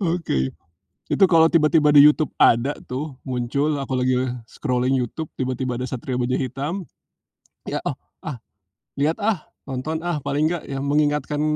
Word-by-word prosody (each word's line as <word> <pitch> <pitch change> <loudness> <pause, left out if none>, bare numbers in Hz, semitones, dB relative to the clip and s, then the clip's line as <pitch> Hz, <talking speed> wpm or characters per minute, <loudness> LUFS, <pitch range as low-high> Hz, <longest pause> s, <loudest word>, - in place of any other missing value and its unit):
Oke. 165 - 0 0.5
Itu 195 - +4
kalau 165 -2 +6
tiba-tiba 155 -2 +4
di 145 - +9
YouTube 150 0 +5
ada 125 +5 +5 0.2
tuh, 140 +3 -4
muncul, 135 +4 0
aku 135 -1 -4
lagi 130 0 +2 0.3
scrolling 130 -1 0
YouTube 130 +5 -3
tiba-tiba 130 -1 -2
ada 125 - -3
Satria 130 0 -4
Baja 125 0 0
Hitam, 135 - -2 0.8
lihat, - - -3
oh, - - -3 0.2
ah, 150 -5 -5 0.6
lihat, 150 +4 0
ah, 210 -1 -1 0.2
nonton, 135 +4 -3
ah, 170 -4 -1
paling 145 +2 0
enggak 170 - -4
yang 135 0 -3
mengingatkan 150 0 +1
140 Hz, 150 wpm, -22 LUFS, 130-155 Hz, 0.8 s, di